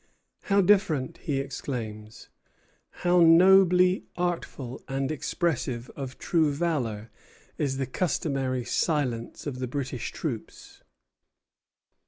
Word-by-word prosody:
"How 200 0 +3
different!" 170 -6 +2
he 145 -4 -2
exclaims, 115 -6 -6 0.8
"how 175 0 +5
nobly 180 +2 +6
awful 170 -8 -3
and 135 +1 -2
expressive 135 -6 -2
of 135 -2 -6
true 160 -4 +1
valor 130 -9 -2 0.5
is 135 -3 0
the 135 - -1
customary 135 -4 -1
silence 130 -9 -1
of 135 -4 -4
the 130 - -2
British 130 -1 -4
troops!" 125 -9 -6
140 Hz, 100 wpm, -27 LUFS, 125-170 Hz, 0.8 s, nobly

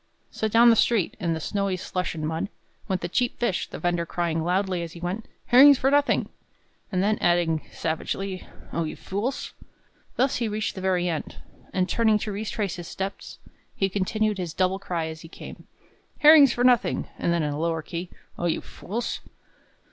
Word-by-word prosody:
So 220 - -1
down 235 +2 +6
the - - +5
street, 220 -5 +2
in 170 -4 0
the - - -4
snowy 200 +2 -1
slush 180 -2 -3
and 155 -1 -3
mud, 160 +5 -2 0.4
went 185 -1 -1
the 175 - -2
cheap 245 +7 0
fish, 220 -7 -1
the - - -7
vender 175 -1 0
crying 170 -1 -1
loudly 185 +1 0
as 165 -1 -6
he 170 - -10
went, 180 +6 -4 0.2
"Herrings 275 +3 +8
for 270 +2 +2
nothing!" 290 0 +3 0.6
and 185 -1 +1
then 215 +1 +1
adding 170 -2 +2
savagely, 185 +4 -3 0.3
"O 170 - 0
you 155 - -4
fools!" 215 +8 -4 0.6
Thus 265 +1 +2
he 235 - -1
reached 215 +1 -2
the 190 - -7
very 185 -2 +1
end; 160 -3 -3 0.4
and, 185 -1 +1
turning 220 -1 +3
to 210 0 -4
retrace 205 -2 -3
his 175 -2 -7
steps, 195 +2 -6 0.4
he 195 - +1
continued 205 +2 0
his 170 -3 -4
double 185 +1 +1
cry 175 -4 -2
as 160 0 -7
he - - -10
came, - - -11 0.5
"Herrings 295 -3 +9
for 240 - -1
nothing!" 245 -2 +3
and 170 - +1
then 170 -2 +1
in 150 -1 -1
a 145 - -4
lower 165 -1 -1
key, 170 +2 -5 0.3
"O 175 - 0
you 165 - 0
fools!" 230 +5 -5
185 Hz, 190 wpm, -25 LUFS, 170-215 Hz, 0.6 s, Herrings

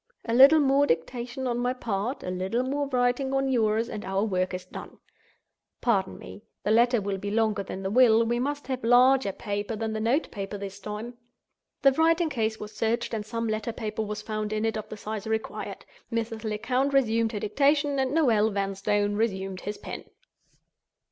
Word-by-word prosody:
A 230 - -2
little 275 +6 +8
more 280 0 +3
dictation 240 +10 -2
on 240 -1 -1
my 245 +1 0
part, 235 0 -3
a 180 - -3
little 190 +7 -1
more 280 +2 -1
writing 255 +1 +1
on 270 0 +1
yours, 225 -2 +2
and 210 - -6
our 195 +1 -1
work 185 -4 0
is 180 0 -5
done. - - -10 0.8
Pardon 195 -6 0
me. 95 +2 -11 0.2
The 210 - +1
letter 240 +2 +4
will 200 -1 -3
be 205 - -4
longer 215 -1 +1
than 190 0 -6
the 190 - -2
will; 230 -1 +5
we 240 +1 0
must 285 +3 -2
have 260 -2 -4
larger 250 -1 +5
paper 205 +2 -4
than 220 0 -3
the 215 - -2
note 240 +8 +1
paper 200 0 -5
this 200 0 -7
time." 215 +4 -7 0.6
The 275 - +7
writing 325 +3 +2
case 220 -3 -1
was 210 0 -8
searched, 230 +2 -1
and 215 -2 -2
some 230 +2 -3
letter 215 +1 -2
paper 220 -1 -4
was 210 0 -4
found 215 -1 -3
in 215 +1 -1
it 225 - 0
of 215 - -5
the 215 - -7
size 215 0 -5
required. 220 0 -4 0.3
Mrs. 225 -1 -3
Lecount 250 +6 0
resumed 230 -4 +2
her 210 - -2
dictation; 280 +6 +2
and 265 -1 0
Noel 235 -9 +3
Vanstone 205 +1 0
resumed 195 -4 -2
his 205 +1 -5
pen. - - -8
225 Hz, 190 wpm, -27 LUFS, 205-250 Hz, 0.8 s, little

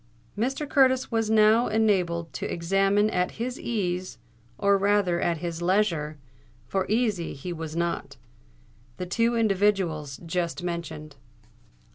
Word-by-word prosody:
Mr. 265 +7 -1
Curtis 260 -2 +3
was 225 -1 0
now 220 +2 +5
enabled 180 -7 +1
to - - -4
examine 195 +4 +2
at 180 0 0
his 245 +2 -4
ease—or 180 - -2
rather 195 -3 +2
at 170 -1 +1
his 170 0 -5
leisure, 175 -5 +1 0.5
for 190 -1 -1
easy 215 -6 0
he 175 +6 -5
was 160 -1 -6
not—the 115 - -7
two 230 +6 +1
individuals 195 -9 +1
just 170 +1 -2
mentioned. 160 -4 -5
180 Hz, 115 wpm, -26 LUFS, 165-215 Hz, 0.5 s, now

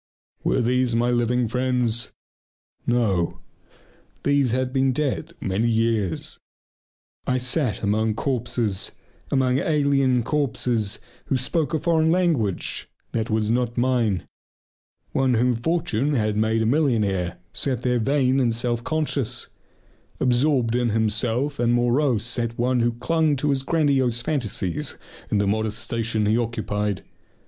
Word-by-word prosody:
Were - - +2
these 125 0 +1
my 120 +1 +2
living 120 0 +1
friends? 125 -1 0 0.8
No, 105 -8 +1 0.9
these 140 -2 +3
had 130 +2 -1
been 135 -1 +2
dead 150 +4 -2
many 100 +5 0
years. 110 -5 0 0.9
I 130 - +2
sat 125 -3 0
among 110 +1 +1
corpses, 120 -5 -1 0.4
among 130 -1 +2
alien 140 -5 +2
corpses 120 -6 0 0.3
who 135 - 0
spoke 145 +4 -1
a 165 +2 0
language 160 - +1 0.2
that 110 -1 -2
was 110 0 +1
not 120 0 0
mine. 120 -6 +1 0.9
One 130 -2 +2
whom 125 +2 +2
fortune 150 0 0
had 110 -3 +1
made 110 +1 +1
a - - 0
millionaire 110 - +1 0.2
sat 130 -4 -1
there 125 -1 +2
vain 135 +2 +2
and 120 -3 +2
self 120 0 -1
conscious. 150 -5 -1 0.7
Absorbed 125 -1 +2
in 120 -1 +1
himself 115 +6 0
and 120 0 +3
morose 120 -1 +2
sat 115 -1 -2
one 125 +1 +1
who 120 0 +2
clung 155 +5 +1
to 145 +2 0
his 135 -1 0
grandiose 135 -6 +1
fantasies 120 - -2 0.3
in - - +1
the 100 - +2
modest 110 +1 0
station 115 -2 -1
he 110 +3 +2
occupied. 105 -4 -2
120 Hz, 130 wpm, -23 LUFS, 110-135 Hz, 0.9 s, these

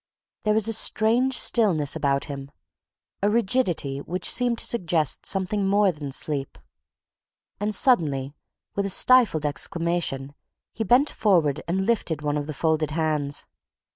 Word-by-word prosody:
There 215 -1 +1
was 220 0 +2
a 225 - 0
strange 235 +4 +2
stillness 175 - +2
about 140 -1 0
him 140 -1 -7 0.7
a 205 - +2
rigidity 195 - 0
which 175 +6 -4
seemed 245 -1 +1
to - - 0
suggest 170 - -1
something 195 +1 0
more 200 0 +3
than 150 -4 -7
sleep. 140 0 -3 1.0
And 210 +1 -1
suddenly, 145 - +1 0.4
with 200 0 -1
a - - -4
stifled 205 -7 +4
exclamation, 150 -2 -2 0.4
he 225 - -3
bent 250 +7 +3
forward 165 -9 +1
and 190 +3 -1
lifted 180 -9 -1
one 145 0 -1
of 145 -1 -3
the 155 - -5
folded 160 -1 0
hands. 150 -2 -1
175 Hz, 140 wpm, -24 LUFS, 145-215 Hz, 1.0 s, stifled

